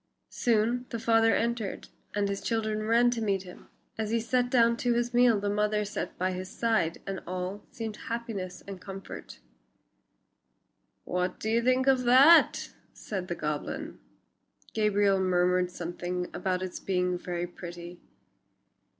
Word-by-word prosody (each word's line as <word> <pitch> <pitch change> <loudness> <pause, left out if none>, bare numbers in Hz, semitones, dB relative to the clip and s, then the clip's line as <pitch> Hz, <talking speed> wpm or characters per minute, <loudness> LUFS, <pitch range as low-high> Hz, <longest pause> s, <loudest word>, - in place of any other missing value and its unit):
Soon 240 +1 +1
the 230 - -3
father 225 0 +3
entered 230 -3 -2 0.3
and 205 -1 +1
the 200 - -1
children 215 0 -1
ran 240 +2 +4
to 235 -2 -2
meet 195 -3 0
him. 180 -1 -13 0.3
As 215 -1 -1
he 230 +1 +1
sat 245 +2 +1
down 235 -2 +4
to 240 0 +1
his 240 +1 0
meal 240 -3 +5
the 205 - -2
mother 210 +1 +1
sat 205 - -5
by 185 +1 0
his 185 +1 -5
side 215 -9 0
and 195 -1 -4
all 185 +3 -4
seemed 225 -2 -6
happiness 230 -7 -5
and 195 -2 -8
comfort. 195 -1 -9 1.7
"What 180 +1 -2
do 220 - -2
you 230 +1 +3
think 255 +2 +2
of 260 -2 +3
that?" 270 +7 +6 0.2
said 190 -4 -5
the 175 - -3
goblin. 150 -2 -4 0.7
Gabriel 205 -2 +3
murmured 180 -1 +2
something 175 +1 -4
about 180 0 -1
its 185 - -5
being 180 -1 0
very 175 -1 -3
pretty. 175 0 -9
205 Hz, 150 wpm, -29 LUFS, 180-230 Hz, 1.7 s, that